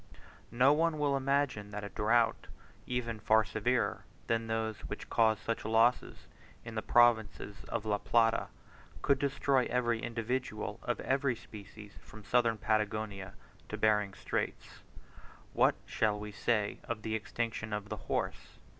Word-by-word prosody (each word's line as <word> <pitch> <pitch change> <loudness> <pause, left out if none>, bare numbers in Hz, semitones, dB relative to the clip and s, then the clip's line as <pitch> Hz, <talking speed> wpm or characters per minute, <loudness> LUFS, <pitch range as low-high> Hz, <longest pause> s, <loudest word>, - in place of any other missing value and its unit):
No 125 +5 +5
one 165 +1 +1
will 145 -2 +1
imagine 135 -6 0
that 105 0 -6
a 100 - -5
drought, 115 +2 +2 0.4
even 120 -3 -2
far 110 +1 +4
severer 115 +5 0 0.2
than 115 0 0
those 110 -1 -2
which - - -7
cause 110 -1 +4
such 115 +1 -3
losses 115 +3 +2 0.4
in 115 - -7
the 110 - -2
provinces 110 -4 +3
of 110 - -3
La 105 -1 0
Plata, 115 0 +2 0.6
could 140 -1 +3
destroy 140 -2 +1
every 120 -2 +1
individual 115 -2 -3
of 120 - -2
every 135 -1 +1
species 105 -1 -12
from 110 0 -13
Southern 115 0 +2
Patagonia 105 -2 -1 0.3
to - - -4
Behring's 105 -2 +2
Straits. - - -4 0.7
What - - +4
shall 105 -1 0
we 105 0 -6
say 105 0 0
of 115 -2 -4
the 110 - -2
extinction 110 0 -3
of 105 -1 -4
the - - -4
horse? - - -3
110 Hz, 145 wpm, -32 LUFS, 105-120 Hz, 0.7 s, No